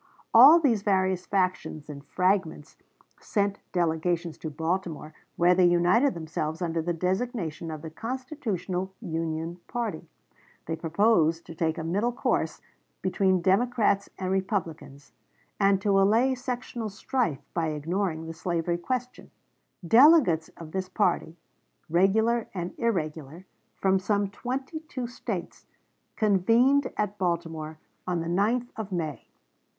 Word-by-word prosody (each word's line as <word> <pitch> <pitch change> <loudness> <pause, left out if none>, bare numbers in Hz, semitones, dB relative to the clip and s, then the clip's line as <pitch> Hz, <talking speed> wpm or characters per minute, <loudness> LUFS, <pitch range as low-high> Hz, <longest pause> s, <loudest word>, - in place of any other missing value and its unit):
All 275 +9 +9
these 245 -10 +2
various 190 -2 +1
factions 185 -6 -1
and 140 -2 -9
fragments 180 -2 -1 0.4
sent 200 -2 -1
delegations 170 -1 0
to 160 - -5
Baltimore, 160 0 -3 0.2
where 175 +1 +4
they 180 0 +5
united 175 +9 +3
themselves 160 -1 -4
under 165 -2 -1
the 175 +2 -2
designation 180 -2 -2
of 155 -2 -7
the 160 - -7
Constitutional 225 - -4
Union 165 -3 -3
Party. 215 -10 -4 0.6
They 165 - -2
proposed 165 -1 +2
to - - -9
take 160 0 -1
a 160 - -4
middle 200 +9 0
course 245 - -1 0.4
between 185 -1 +1
Democrats 200 0 +2
and 185 -1 -3
Republicans, 165 -7 -3 0.5
and 195 -1 +4
to 195 -2 +3
allay 230 +7 +3
sectional 245 -3 -4
strife 215 - -2
by 165 -2 0
ignoring 160 +2 -2
the 165 - -6
slavery 170 0 -2
question. 250 +6 -4 0.5
1860. 175 - -9
Delegates 235 - +6
of 160 -2 -9
this 185 0 -3
party, 180 -4 0 0.5
regular 220 +6 +3
and 175 -1 -4
irregular, 165 - -2 0.3
from 190 0 +2
some 200 +1 0
twenty 265 +8 -4
two 280 -5 -6
States, 240 +1 -6 0.5
convened 230 +7 +3
at 210 -1 -2
Baltimore 165 -3 -2 0.3
on 175 -2 0
the 165 - -4
9th 215 +8 +1
of 215 -3 -6
May. 160 -5 -4
185 Hz, 130 wpm, -27 LUFS, 165-220 Hz, 0.6 s, All